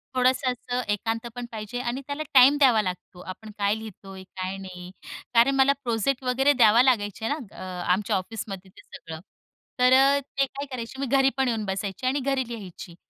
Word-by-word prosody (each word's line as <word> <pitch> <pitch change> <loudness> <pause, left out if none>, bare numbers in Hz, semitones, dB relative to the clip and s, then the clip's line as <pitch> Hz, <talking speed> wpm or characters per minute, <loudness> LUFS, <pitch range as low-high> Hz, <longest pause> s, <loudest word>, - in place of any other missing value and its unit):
थोडंसं 255 +1 +2
असं 250 0 -3
एकांत 225 +3 -2
पण 245 - -5
पाहिजे 220 +2 -5
आणि 250 +2 -3
त्याला 285 +2 -3
टाईम 270 +2 +7
द्यावा 250 -6 +5
लागतो. 180 -2 -6
आपण 215 +4 -9
काय 200 0 +1
लिहितोय 195 -3 -10
काय 185 0 -6
नाही 180 -2 -9 0.4
कारण 245 +4 +5
मला 270 +1 +4
प्रोजेक्ट 245 +3 -1
वगैरे 265 +3 +3
द्यावा 235 -1 +5
लागायचे 220 -4 +1
आहे 255 - +1
ना 230 -9 -13
अ, 185 -1 -6
आमच्या 195 +3 +1
ऑफिसमध्ये 195 -1 -5
ते - - -17
सगळं 160 -1 -10 0.6
तर 250 +1 +5
अ, 275 +2 +5
ते 275 0 -2
काय 275 +1 -7
करायचे 250 +1 -6
मी 275 - -1
घरी 270 0 +4
पण 265 -1 +2
येऊन 225 -3 -1
बसायची 195 +3 -4
आणि 275 +2 +1
घरी 265 -1 -1
लिहायची. 195 -6 -9
230 Hz, 190 wpm, -25 LUFS, 195-265 Hz, 0.6 s, टाईम